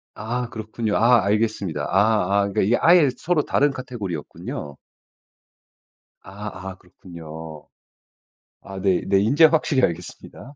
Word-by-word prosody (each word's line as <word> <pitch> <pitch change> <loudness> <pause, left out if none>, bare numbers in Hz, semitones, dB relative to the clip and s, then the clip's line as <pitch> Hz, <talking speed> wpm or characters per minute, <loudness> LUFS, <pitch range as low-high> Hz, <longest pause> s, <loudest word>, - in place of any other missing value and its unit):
아 120 +3 -4
그렇군요. 110 -1 -4
아 120 -1 +4
알겠습니다. 100 -7 -1
아 100 -1 +2
아 100 - -4
이게 110 +5 +2
아예 170 -4 +5
서로 170 -2 0
다른 145 +1 +1
카테고리였군요. 100 - -7 1.5
아 95 -1 -8
아 - - -11
그렇군요. 80 -4 -11 0.9
아 95 -1 -9
네 95 -2 +2
네. 95 0 +3
인제 135 +11 +5
확실히 155 -4 +2
알겠습니다. 90 - -5
105 Hz, 265 characters per minute, -22 LUFS, 90-120 Hz, 1.5 s, 아예